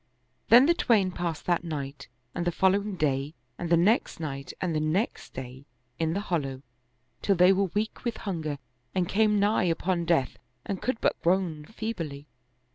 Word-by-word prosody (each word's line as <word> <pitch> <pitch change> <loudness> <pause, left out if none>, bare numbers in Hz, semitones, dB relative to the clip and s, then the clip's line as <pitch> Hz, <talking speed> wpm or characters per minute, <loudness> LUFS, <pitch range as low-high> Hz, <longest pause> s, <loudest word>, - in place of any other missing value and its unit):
Then 245 +3 +9
the 340 - +5
twain 215 - +2
passed 170 -3 -4
that 175 -1 +1
night 140 -4 -5 0.3
and 175 - -2
the - - +2
following 195 +3 +2
day 145 -1 -1 0.2
and 175 - -3
the 170 - +5
next 205 +5 +2
night 140 -4 -5
and 180 -3 -1
the - - +2
next 160 +9 -1
day 130 +1 -8 0.3
in 160 0 +1
the 200 - -1
hollow, 140 -9 -2 0.6
till 200 - +2
they 180 +2 +6
were 195 +1 +2
weak 215 +2 -2
with 235 -3 -2
hunger 160 -7 -3 0.4
and 180 -2 +1
came 210 +1 +3
nigh 205 -1 +3
upon 170 +1 0
death 165 -6 +1 0.3
and 195 -2 -3
could 255 -2 -1
but - - +1
groan 170 -4 +1
feebly. 165 -10 -5
175 Hz, 175 wpm, -28 LUFS, 155-200 Hz, 0.6 s, Then